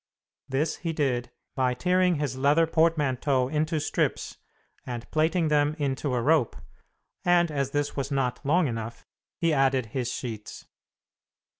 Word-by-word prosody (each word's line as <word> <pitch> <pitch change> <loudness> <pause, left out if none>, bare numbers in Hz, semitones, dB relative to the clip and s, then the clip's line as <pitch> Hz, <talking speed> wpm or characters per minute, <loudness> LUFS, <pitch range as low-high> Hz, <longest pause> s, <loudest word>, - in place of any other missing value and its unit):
This 145 +4 0
he 165 -2 -3
did 130 -6 -1 0.2
by 130 -2 +1
tearing 180 +4 +2
his 145 -4 -2
leather 145 +5 +3
portmanteau 145 -5 +1
into 155 +2 0
strips - - -2 0.4
and 120 -2 -6
plaiting 160 +1 +2
them 150 0 +2
into 140 -2 -1
a 120 - 0
rope, 150 -3 +2 0.7
and 175 -2 +3
as 140 -2 -1
this 145 +1 -2
was 140 -1 -2
not 135 -3 -1
long 165 +5 +3
enough, 115 -1 -5 0.3
he 165 -2 +1
added 135 -3 +2
his 125 -2 -1
sheets. 110 -4 -6
145 Hz, 140 wpm, -27 LUFS, 130-160 Hz, 0.7 s, leather